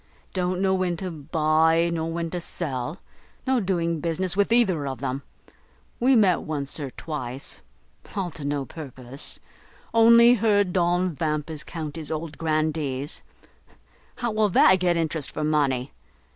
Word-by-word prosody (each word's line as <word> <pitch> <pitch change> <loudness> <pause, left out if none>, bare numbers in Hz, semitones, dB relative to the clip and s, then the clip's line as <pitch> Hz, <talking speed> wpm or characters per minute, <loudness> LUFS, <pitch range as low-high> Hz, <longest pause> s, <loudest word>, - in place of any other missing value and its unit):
don't 180 -1 -1
know 190 0 +2
when 185 -2 0
to 185 +1 -4
buy 160 +2 +2
nor 165 0 -2
when 170 0 -2
to 180 - -3
sell. 150 -2 -4 0.5
No 260 -1 +2
doing 170 -5 0
business 170 +4 0
with 200 +2 +2
either 190 -12 +3
of 135 -1 -4
them. 135 0 -3 0.8
We 255 +2 +4
met 195 -6 +4
once 145 -1 -4
or 140 -2 -4
twice; 135 -2 -6 0.5
all 190 -4 -2
to 150 -1 -8
no 145 -1 -1
purpose; 130 -3 -4 0.5
only 235 +1 +7
heard 205 -5 +2
Don 180 0 +2
Vampus 155 0 -2
count 160 -2 -6
his 160 -1 -5
old 155 -1 -5
Grandees; 155 -3 -1 0.9
how 240 -2 -2
will 215 -1 +2
that 190 0 +5
get 175 -1 +2
interest 160 -3 -1
for 155 - -4
money? 140 -4 +1
165 Hz, 145 wpm, -25 LUFS, 150-185 Hz, 0.9 s, only